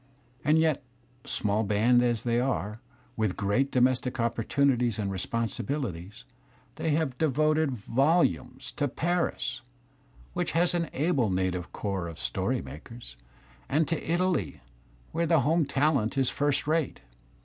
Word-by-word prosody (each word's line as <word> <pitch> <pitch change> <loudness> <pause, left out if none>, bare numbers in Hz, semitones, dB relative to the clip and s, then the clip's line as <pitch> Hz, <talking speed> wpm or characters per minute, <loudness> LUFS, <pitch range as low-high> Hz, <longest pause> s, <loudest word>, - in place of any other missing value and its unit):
And 150 +2 +4
yet, 160 -3 +2 0.4
small 105 0 0
band 110 +4 +3
as 120 -2 +1
they 120 0 +1
are, 115 -4 -2 0.3
with 110 -4 -1
great 110 +7 +1
domestic 125 0 +1
opportunities 120 0 +1
and 100 -2 -2
responsibilities, 110 - -3 0.5
they 160 - -1
have 145 -6 -1
devoted 155 +1 +2
volumes 130 - +1
to 145 - +1
Paris, 140 -5 -1 0.7
which - - -2
has 170 +2 +3
an 170 -2 -1
able 140 - +1
native 90 -1 -1
corps 95 -4 -3
of 85 -2 -8
story - - -1
makers, 75 - -10 0.5
and 155 +2 +2
J 165 - +1
to - - -5
Italy, 175 - 0 0.5
where 170 +1 0
the 160 -3 +4
home 155 +2 +2
talent 140 -5 +1
is 135 -2 +2
first 145 -1 0
rate. 155 -2 0
125 Hz, 135 wpm, -28 LUFS, 110-155 Hz, 0.7 s, And